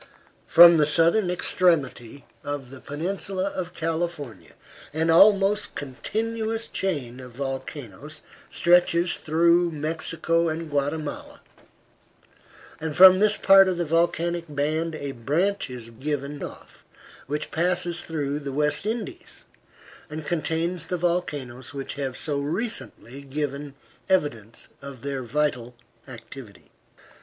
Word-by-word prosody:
From 170 0 +9
the 150 -1 +3
southern 170 +6 +3
extremity 160 -8 0 0.2
of 145 -3 -5
the 135 - -10
peninsula 190 +6 -3
of 180 -1 -5
California 160 - -4 0.4
an 160 +1 +2
almost 200 +3 +4
continuous 220 - -3
chain 140 -10 -3
of 125 -2 -11
volcanoes 135 +2 -6 0.3
stretches 175 0 +3
through 170 +2 +3
Mexico 165 +2 -1
and 160 0 -5
Guatemala, 145 +2 -3 1.4
and 160 -1 -4
from 185 0 +9
this 210 +1 +3
part 195 0 +7
of 180 - -1
the 175 - -1
volcanic 170 +1 0
band 155 +3 -1
a 140 -2 -5
branch 155 - -1
is 120 -2 -8
given 145 +3 -4
off - - -10 0.4
which 150 +2 -4
passes 175 0 0
through 145 -3 -3
the 140 -2 -6
West 150 +6 +1
Indies, 240 +11 -5 0.6
and 155 0 -7
contains 165 +1 -2
the 180 - -2
volcanoes 145 -8 -3
which 135 -1 -5
have 135 -2 -4
so 145 -3 -2
recently 145 - -4
given 140 0 -4 0.3
evidence 115 - -1
of 140 -3 -10
their 140 -1 -3
vital 125 -2 -2 0.3
activity. 115 -3 -12
155 Hz, 115 wpm, -25 LUFS, 140-175 Hz, 1.4 s, From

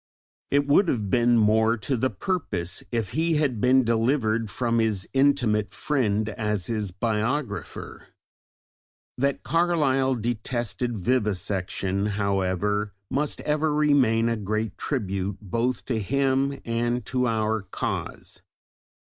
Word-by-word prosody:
It 145 0 +2
would 145 +7 +4
have 105 - -1
been 120 0 +4
more 110 +1 +3
to 120 +6 -2
the 130 +2 +1
purpose 105 - -2
if 115 -4 -2
he 165 +1 +1
had 140 -8 0
been 130 +1 +5
delivered 115 -1 +1
from 115 +1 0
his 105 -4 0
intimate 130 -7 +2
friend 110 -8 0
as 105 -4 -2
his 105 -2 -2
biographer! 115 +8 -3 1.1
That 140 +1 0
Carlyle 145 -5 +2
detested 120 +1 -2
vivisection, 100 -3 -1
however, 100 +1 0 0.2
must 145 +2 -1
ever 150 +1 0
remain 130 -7 +3
a 115 -1 0
great 110 0 -2
tribute 100 -7 -2
both 115 +5 -2
to 115 -4 -1
him 135 +4 0
and 120 0 -1
to 125 +2 0
our 110 -1 0
cause. 100 - -5
115 Hz, 120 wpm, -25 LUFS, 105-135 Hz, 1.1 s, been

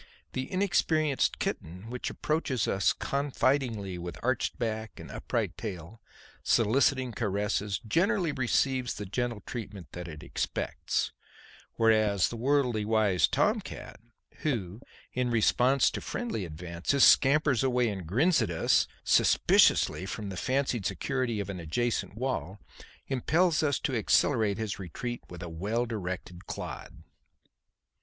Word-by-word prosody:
The 130 0 -4
inexperienced 160 -6 +1
kitten 90 +8 -4
which 125 - -3
approaches 150 -6 -1
us 95 - +2
confidingly 130 -8 -1
with 85 -2 -6
arched - - 0
back 110 -2 -3
and - - -9
upright - - -2
tail, 100 0 -7 0.4
soliciting 130 +3 +2
caresses, 105 -2 -1
generally 180 - +2
receives 130 -1 0
the 105 - -5
gentle 120 +2 -2
treatment 100 - -7
that 90 0 -7
it 75 -2 -9
expects; - - -2 0.6
whereas 110 -4 +3
the - - -6
worldly 125 -3 +1
wise 105 -5 +3
tom - - +2
cat, - - -9 0.4
who, 110 - -3 0.3
in 125 -1 0
response 125 +3 +3
to - - -5
friendly 230 - -3
advances, 85 - -1
scampers 140 -2 +5
away 125 -2 +2
and 95 -6 -4
grins 145 - +3
at 110 - 0
us 85 -2 +2 0.2
suspiciously 95 - +4
from 105 0 -5
the 95 - -6
fancied 130 0 0
security 125 +1 -1
of 100 - -3
an 100 -2 -5
adjacent 100 +4 -1
wall, 110 - -3 0.5
impels 155 +6 +2
us 145 -3 +1
to 140 -4 -2
accelerate 110 -2 +2
his 110 -3 -3
retreat 120 +7 -5
with 90 0 -8
a - - -5
well 105 +9 -1
directed 95 -5 -5
clod. - - -7
115 Hz, 130 wpm, -29 LUFS, 95-130 Hz, 0.6 s, scampers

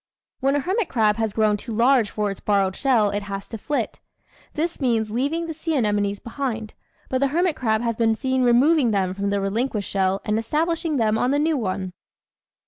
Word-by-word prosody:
When 275 +1 +1
a - - +2
hermit 380 - -1
crab 215 -3 +2
has 225 -2 0
grown 215 0 +2
too 230 - -8
large 235 0 +3
for 210 -1 -2
its 195 - -8
borrowed 195 -2 +1
shell 235 -7 +2
it 205 - -2
has 200 -1 -6
to 225 - -5
flit. 290 +7 -2 0.6
This 325 +1 -2
means 225 -4 +1
leaving 285 +9 -1
the 325 - -5
sea 320 +1 -3
anemones 205 -4 0
behind, 230 -3 -4 0.3
but 260 - -1
the 275 - +3
hermit 335 +3 +1
crab 220 -5 0
has 230 -2 -1
been 225 -1 +2
seen 260 +2 0
removing 255 +3 +4
them 190 -3 0
from 200 +1 -2
the 200 0 0
relinquished 210 +2 -2
shell 190 0 +1
and 215 +1 +1
establishing 320 +5 -1
them 220 -2 +2
on 250 - +1
the 280 - +2
new 310 +2 +2
one. 190 -6 -3
230 Hz, 205 wpm, -23 LUFS, 205-280 Hz, 0.6 s, removing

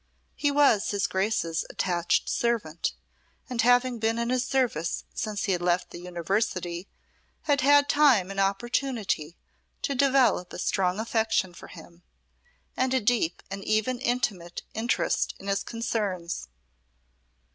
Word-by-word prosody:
He 290 - +1
was 280 -8 +4
his 200 -1 0
Grace's 190 -4 0
attached 175 -2 0
servant, 215 -9 -1 0.5
and 245 -3 0
having 245 0 +3
been 225 +1 +1
in 235 +1 -1
his 255 -1 +1
service 245 - 0
since 210 -2 -3
he 200 - 0
had 180 -2 0
left 175 0 0
the - - -8
University 180 0 -2 0.6
had 290 -2 +2
had 285 +1 +5
time 260 -12 +4
and 195 - -4
opportunity 200 - -1 0.5
to 280 - 0
develop 260 -8 +3
a - - -6
strong 185 +1 0
affection 220 -4 0
for - - -12
him, 170 0 -14 0.7
and 260 0 +1
a - - +4
deep 215 -6 0
and 195 0 -5
even 220 +5 0
intimate 210 -9 -2
interest 225 +2 0
in - - -13
his 195 0 0
concerns. 205 - -3
215 Hz, 135 wpm, -27 LUFS, 180-245 Hz, 0.7 s, had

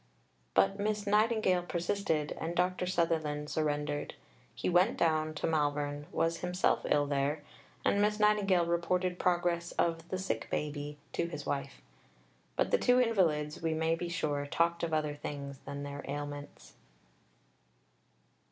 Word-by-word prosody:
But 195 - +3
Miss 210 0 -1
Nightingale 210 -3 +3
persisted, 175 -3 -1
and 165 +2 -2
Dr. 180 +1 +1
Sutherland 160 -4 0
surrendered. 150 -1 -1 0.4
He - - -3
went 180 +6 +4
down 155 -1 +1
to - - -2
Malvern, 145 -2 0
was 165 0 +1
himself 180 +1 +1
ill 145 -1 +3
there, 145 +1 0 0.4
and 200 - +3
Miss 210 +1 +2
Nightingale 205 -4 +4
reported 180 +1 0
progress 175 -1 +1
of 165 0 0
"the 185 - -1
sick 190 +1 -2
baby" 145 0 -3 0.2
to 170 - 0
his 150 -4 -6
wife. 140 -1 -3 0.7
But - - +1
the 485 - +4
two 250 0 +4
invalids, 165 -11 +2
we 165 -1 0
may 160 +1 +1
be 170 +1 -3
sure, 145 -4 -1
talked 170 +3 +1
of 170 - -1
other 155 -1 0
things 140 -2 -6
than 140 0 -5
their 145 0 -6
ailments. 145 0 -6
165 Hz, 145 wpm, -32 LUFS, 150-180 Hz, 0.7 s, went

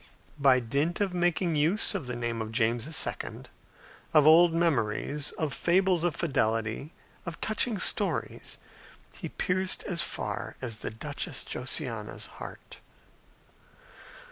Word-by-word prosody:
By 135 -2 +5
dint 140 +8 -1
of 200 -3 0
making 175 -1 +1
use 165 +11 +3
of 175 -10 -4
the 125 - -3
name 120 -1 -2
of 110 0 -5
James 115 +2 +1
II., 160 - -1 0.7
of 150 -2 +7
old 165 +2 +8
memories, 150 -3 +1
of 155 -3 -2
fables 180 -1 +2
of 175 -5 +1
fidelity, 115 -2 -1 0.3
of 170 -2 -7
touching 220 0 +1
stories, - - -1 0.6
he - - -6
pierced 185 0 +1
as 170 -4 -1
far - - -4
as 115 -4 -4
the - - -4
Duchess 145 +6 -4
Josiana's - - -3
heart. - - -10
155 Hz, 125 wpm, -29 LUFS, 120-175 Hz, 0.7 s, old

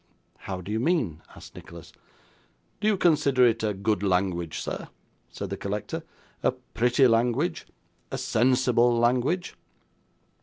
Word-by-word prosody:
'How 95 -1 -6
do 95 - -7
you 110 - 0
mean?' 120 - 0
asked - - -13
Nicholas. 85 -1 -12 0.9
'Do 210 - 0
you 210 -2 +3
consider 145 -7 +4
it 115 -1 +2
a 110 -1 0
good 100 0 0
language, 90 -4 0
sir?' - - -5 0.4
said 100 -2 -7
the 100 - -3
collector; 105 - -4 0.4
'a - - +2
pretty 125 0 +1
language, 125 +8 +1 0.4
a - - -4
sensible 120 0 +2
language? 125 +9 +1
120 Hz, 130 wpm, -26 LUFS, 100-130 Hz, 0.9 s, consider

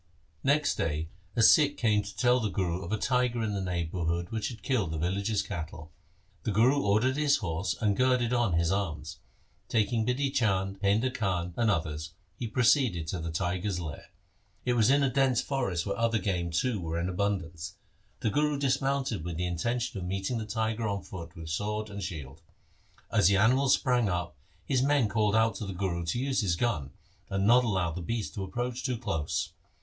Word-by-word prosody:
Next 145 +2 +2
day 80 0 -1 0.3
a 115 - +3
Sikh 145 +4 +6
came 105 -3 +3
to 100 0 -10
tell 125 0 +4
the 110 -3 -1
Guru 90 -2 -1
of 85 - -6
a 110 - +1
tiger 125 -1 +1
in 105 -2 -1
the 100 - -2
neighbourhood 85 -1 -2
which 110 -1 -1
had 115 -5 -8
killed 110 -6 0
the 80 - -3
villagers' 100 +6 0
cattle. 80 -4 -6 0.5
The 110 - -3
Guru 125 +8 +4
ordered 110 +7 +2
his 150 -2 +3
horse 90 -1 -2
and 105 -3 +2
girded 125 -1 +2
on 120 -6 +2
his 85 +1 +2
arms. 80 -5 -3 0.5
Taking 110 0 +1
Bidhi 135 +4 0
Chand, 95 -6 +1
Painda 110 +6 +2
Khan, 90 -6 -1
and 115 -2 +2
others, 80 -3 -2 0.2
he 120 - -4
proceeded 115 - +3
to 90 - -2
the 80 +1 -4
tiger's 90 +3 -1
lair. 80 -5 -7 0.6
It 125 - +2
was 115 -1 +4
in 140 +1 +4
a 135 - +3
dense 130 -2 +3
forest 125 -12 -1
where 100 - -1
other 115 +1 +1
game 90 -4 -1
too 105 +7 0
were 85 0 -2
in 85 - -1
abun 95 +2 0
dance. 85 +1 -8 0.5
The 110 - +1
Guru 150 +4 +1
dismounted 135 - 0
with 85 -1 -4
the 90 - -1
intention 115 +7 -2
of 90 - -5
meeting 95 +5 -2
the 110 - -5
tiger 110 +1 -1
on 100 -2 -2
foot 85 -3 -9
with 80 -1 -8
sword 105 +4 -2
and 100 0 -6
shield. 80 -5 -6 0.7
As - - +4
the 100 0 +4
animal 130 +6 +4
sprang 125 -5 +3
up, 90 -2 -2 0.3
his 130 -3 +1
men 140 -3 +3
called 105 0 +2
out 110 0 +3
to 105 - -5
the 95 - -4
Guru 85 -2 -2
to 85 - -1
use 135 0 0
his 90 -5 +1
gun, 85 - -1 0.4
and 95 0 0
not 120 +4 +6
allow 95 -7 0
the 90 +3 -5
beast 110 +4 -3
to 100 - -4
approach 120 +6 -3
too 125 -3 -1
close. 80 - -2
105 Hz, 200 wpm, -29 LUFS, 90-120 Hz, 0.7 s, Sikh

